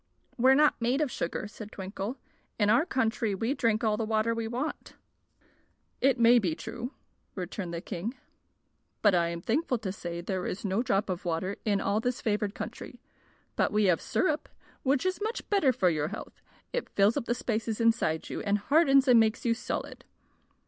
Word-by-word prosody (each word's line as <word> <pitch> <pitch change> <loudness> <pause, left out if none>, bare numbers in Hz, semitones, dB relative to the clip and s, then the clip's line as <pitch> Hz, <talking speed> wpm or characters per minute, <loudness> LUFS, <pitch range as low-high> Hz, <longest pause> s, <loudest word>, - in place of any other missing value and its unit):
"We're 260 +2 +5
not 300 -3 +3
made 245 +4 +1
of 300 -5 0
sugar," 170 +4 -3
said 215 0 -10
Twinkle. 195 +5 -5 0.4
"In 210 -1 +3
our 265 +10 +3
country 225 - 0
we 225 +7 0
drink 230 -5 +1
all 215 -2 +2
the 225 - -1
water 220 +1 +1
we 230 -1 -3
want." 250 +7 -4 1.1
"It 265 -2 +3
may 235 +1 +7
be 175 -7 -1
true," 235 - -6 0.4
returned 180 -1 -5
the 170 0 -4
king; 205 +11 -5 0.9
"but 205 -2 +6
I 170 -1 +3
am 170 0 -4
thankful 255 - 0
to 210 -4 -4
say 175 -3 -5
there 180 +1 -3
is 200 - -4
no 195 +3 +1
drop 200 -4 +1
of 185 -2 -3
water 180 +3 -2
in 205 -2 +2
all 200 +2 +1
this 245 +2 -1
favored 210 -1 -1
country. - - -7 0.6
But - - +1
we 210 0 +2
have 180 -4 +3
syrup, 310 -5 0 0.3
which 275 +4 +1
is 370 +2 -1
much 445 +3 -3
better 390 -10 +4
for 185 -7 +2
your 150 -2 -1
health. 205 +6 -8 0.3
It - - -2
fills 200 +3 +3
up - - -2
the 240 - 0
spaces 225 -2 -2
inside 230 -9 +1
you, - - -4
and 205 0 +1
hardens 275 +3 +4
and 245 -2 +7
makes 220 +2 +1
you 235 - +3
solid." 230 - -5
220 Hz, 190 wpm, -29 LUFS, 195-250 Hz, 1.1 s, may